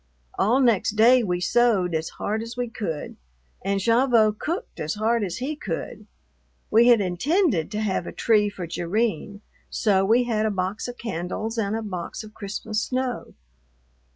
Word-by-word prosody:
All 235 +6 +3
next 230 -6 +2
day 240 +4 +6
we 180 -5 -1
sewed 195 -2 +2
as 160 0 -1
hard 215 +2 -2
as 230 +2 -7
we 245 0 -1
could, 170 -11 -5 0.5
and 195 +1 0
Gavotte 230 -1 +3
cooked 355 +9 -4
as 155 +4 -2
hard 225 +1 +1
as 180 -3 -3
he 280 +5 -3
could. 300 - -6 0.6
We 230 +2 +6
had 235 -3 +6
intended 200 - +1
to 210 +1 -3
have 190 -4 -1
a - - -5
tree 210 -2 +2
for 190 -3 -6
Jerrine, 200 +3 -2 0.3
so 195 -3 +2
we 230 +5 +4
had 220 -3 0
a - - +1
box 195 +2 -2
of 245 0 -7
candles 220 +2 -4
and 205 0 -1
a 225 - -3
box 185 -1 -5
of 215 0 -12
Christmas 215 +1 -4
snow. 255 0 -3
215 Hz, 170 wpm, -24 LUFS, 195-235 Hz, 0.6 s, day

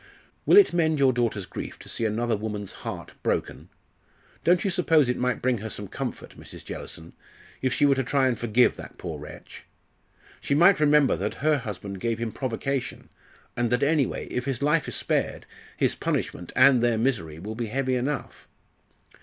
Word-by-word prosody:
"Will - - +7
it 405 - +7
mend 160 -3 +2
your 135 -2 +4
daughter's 115 -5 -1
grief - - -7
to - - -14
see 115 - -2
another 115 +2 0
woman's 105 -2 -5
heart - - -7
broken? - - -2 0.7
Don't 175 +1 +3
you 195 - 0
suppose 160 -5 +3
it 125 - +1
might 125 0 -1
bring 125 -3 +1
her 110 +2 -5
some 105 -1 -6
comfort, - - -6
Mrs. - - -12
Jellison, 85 0 -8 0.5
if 130 - +1
she 145 - +3
were 140 - +5
to 135 0 0
try 135 +1 +2
and 125 - +1
forgive 120 +1 +2
that - - -10
poor - - -6
wretch? - - -11 0.8
She 140 - -1
might 175 +5 +6
remember 150 -2 +4
that - - -3
her 155 -2 +4
husband 100 -4 -6
gave 115 +2 -1
him 115 -1 -3
provocation, 130 +2 -3 0.5
and 120 -1 0
that 125 +3 +2
anyway, 145 -2 +1
if 125 - -3
his 135 -1 -2
life 150 +2 +2
is - - -4
spared, - - -1 0.3
his - - +2
punishment 90 - -3
and 130 -1 +6
their 120 -2 +2
misery 110 - -1
will 105 +6 -6
be 115 +1 -4
heavy 130 +3 -1
enough!" 135 +4 -3
125 Hz, 185 wpm, -26 LUFS, 110-140 Hz, 0.8 s, Will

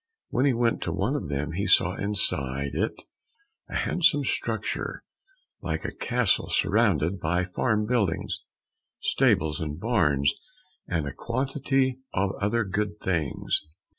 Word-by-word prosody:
When 130 - +2
he 135 - +4
went 115 0 +1
to 85 - -2
one 100 - 0
of 110 - -3
them 70 +2 -2
he 100 +5 -2
saw 90 -1 +5
inside 70 -10 -1
it 105 - -2 0.7
a - - -6
handsome - - +3
structure - - -2 0.6
like - - -3
a - - -3
castle 125 -4 +1
surrounded 90 +5 +2
by 85 +2 +1
farm 105 +3 0
buildings, 105 -7 0 0.6
stables 75 +1 +2
and 75 0 -4
barns, 75 - +2 0.5
and 80 -4 -1
a 70 - -4
quantity 130 +1 0 0.2
of 95 0 +1
other 115 +4 +2
good 105 +1 -2
things. 80 -7 0
100 Hz, 135 wpm, -27 LUFS, 80-115 Hz, 0.7 s, saw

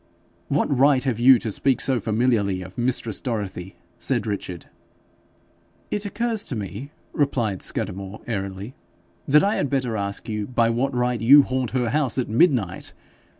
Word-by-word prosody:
'What 140 0 +1
right 135 0 +4
have 130 -5 -1
you 130 +1 +7
to 110 - -4
speak 135 +5 +1
so 130 -2 +1
familiarly 105 -4 0
of 90 +1 -12
mistress 120 -3 -2
Dorothy?' 100 -6 -4 0.2
said - - 0
Richard. 100 -5 -5 1.3
'It 205 0 -2
occurs 230 0 -2
to 130 - -4
me,' 105 +5 -6 0.2
replied 120 -9 0
Scudamore, 95 +2 -4
airily, 100 +1 -4 0.5
'that 150 +2 +5
I 205 +2 +1
had 145 - -1
better 130 -4 -1
ask 100 -1 -4
you 105 -2 -3
by 115 -2 +2
what 130 +4 0
right 125 -1 0
you 140 +5 +8
haunt 130 -2 -2
her 125 -3 -1
house 140 -4 0
at 130 - 0
midnight. 115 - +1
120 Hz, 155 wpm, -23 LUFS, 105-135 Hz, 1.3 s, you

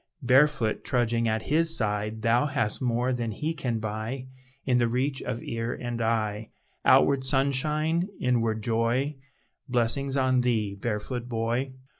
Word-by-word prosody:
Barefoot, 130 -2 +3
trudging 120 -2 +1
at 110 -1 0
his 165 +2 +3
side, 105 0 -2
Thou 120 +5 +3
hast 125 -6 -1
more 125 +1 0
than 120 -2 -2
he 150 +9 -2
can 130 -8 -2
buy 110 +5 -4 0.4
In 125 -2 +3
the 120 - +3
reach 130 +3 -1
of 115 - -4
ear 115 0 -3
and 120 -1 -4
eye, 110 -1 -1 0.3
Outward 140 -2 +4
sunshine, 150 +5 +1
inward 115 -3 0
joy; 120 +6 0 0.5
Blessings 130 +3 +1
on 130 -1 +3
thee, 110 -5 0
barefoot 115 +4 -4
boy! 120 +3 -1
120 Hz, 140 wpm, -27 LUFS, 115-135 Hz, 0.5 s, Outward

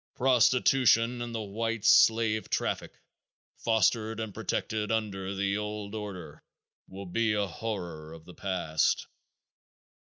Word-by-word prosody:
Prostitution 125 -2 +3
and 120 -1 -5
the 110 - -2
white 115 +2 -3
slave 110 -2 +4
traffic, - - -2 0.6
fostered 110 0 +1
and 110 -3 -4
protected 105 +2 -2
under 100 -3 -2
the 100 0 0
old 105 -1 -5
order, 100 -6 -7 0.4
will 100 +1 -9
be 110 +4 0
a 105 -1 +1
horror 85 -5 -6
of 80 0 -12
the 90 - -12
past. 85 -6 0
105 Hz, 120 wpm, -29 LUFS, 95-115 Hz, 0.6 s, slave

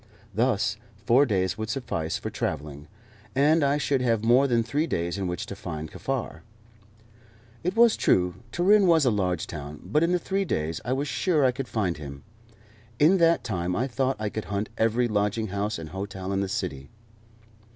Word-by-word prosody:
Thus 110 -1 +1 0.3
four 130 +6 +5
days 95 -2 0
would 110 0 -3
suffice 85 -10 -2
for - - -5
travelling, 75 0 -4 0.5
and 150 +4 +4
I 140 +1 +2
should 140 -2 0
have 115 -3 +1
more 125 +4 +5
than 120 -3 +2
three 145 +8 -1
days 85 - -2
in 100 -2 -2
which 90 +5 -3
to 100 - -7
find 80 -5 -6
Kaffar. 125 -11 -4 1.2
It 180 +2 -1
was 230 -1 +6
true 90 -1 +2 0.2
Turin 195 - +4
was 165 -4 +5
a 125 - +4
large 90 -5 0
town, 75 -2 -7
but 150 - +1
in 175 +2 +3
three 195 +3 -1
days 80 - -2
I 120 - -3
was 140 +3 0
sure 155 -1 +1
I 130 - +4
could 130 0 -5
find 95 -9 -1
him. 70 -2 -9 0.7
In 165 +8 +5
that 165 0 +4
time 90 -5 -2
I 120 - 0
thought 135 +1 -1
I 110 -1 -1
could 110 -2 -5
hunt 100 +4 -3
every 115 +2 +2
lodging 105 0 0
house 100 +2 -2
and 80 -1 -7
hotel 95 +1 -5
in 95 - 0
the 100 -1 -1
city. 70 -7 -4
110 Hz, 185 wpm, -26 LUFS, 90-140 Hz, 1.2 s, was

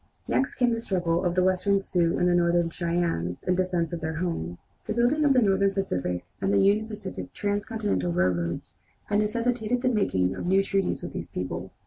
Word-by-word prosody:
Next 265 - 0
came 245 -1 +2
the 230 - -2
struggle 175 -5 0
of 175 -1 0
the 185 - +3
Western 185 +2 +2
Sioux 175 -3 +1
and 180 0 +3
Northern 170 -1 +2
Cheyennes 170 - -1
in 180 - +1
defence 180 -2 0
of 170 - -4
their 160 0 -3
homes. 155 - -3 0.3
The 215 - -2
building 245 +6 +2
of 285 -2 +5
the 255 -2 +4
Northern 195 -1 +2
Pacific 90 - -2 0.2
and 195 - +1
the 200 - +3
Union 200 +2 +3
Pacific 210 -3 -7
transcontinental 205 - -1
railroads 85 -1 -1 0.3
had 205 0 +2
necessitated 235 +2 0
the 255 - +3
making 95 - +1
of - - -5
new 190 +2 +4
treaties 195 -1 -1
with - - -6
these - - -5
people. 90 0 -4
185 Hz, 190 wpm, -26 LUFS, 165-210 Hz, 0.3 s, of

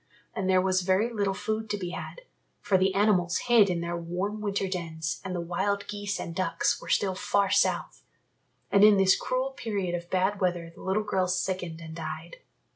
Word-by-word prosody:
And 190 -1 -1
there 185 -1 +4
was 185 0 +2
very 190 +6 +1
little 200 -3 0
food 220 +1 -3
to 205 - -1
be 180 -3 -5
had, - - -7 0.4
for 205 -2 0
the 190 0 +3
animals 185 -4 +3
hid 235 -5 +4
in 175 -2 -1
their 170 0 -3
warm 180 +5 -3
winter 200 -2 -1
dens 165 -4 -4
and 185 -1 -4
the - - -2
wild 190 +4 -1
geese 205 -1 -3
and 170 - -5
ducks 185 - 0
were - - -10
still 195 -2 +2
far 200 0 +1
south. - - +1 0.7
And 200 - +5
in 210 -1 +8
this 190 0 +5
cruel 260 +1 -1
period 205 -9 -3
of 175 0 -4
bad 190 +2 0
weather 175 -2 -1
the - - -14
little 195 +3 0
girl 190 -3 0
sickened 180 -2 -2
and 160 -1 -8
died. 165 - -6
190 Hz, 200 wpm, -28 LUFS, 180-205 Hz, 0.7 s, in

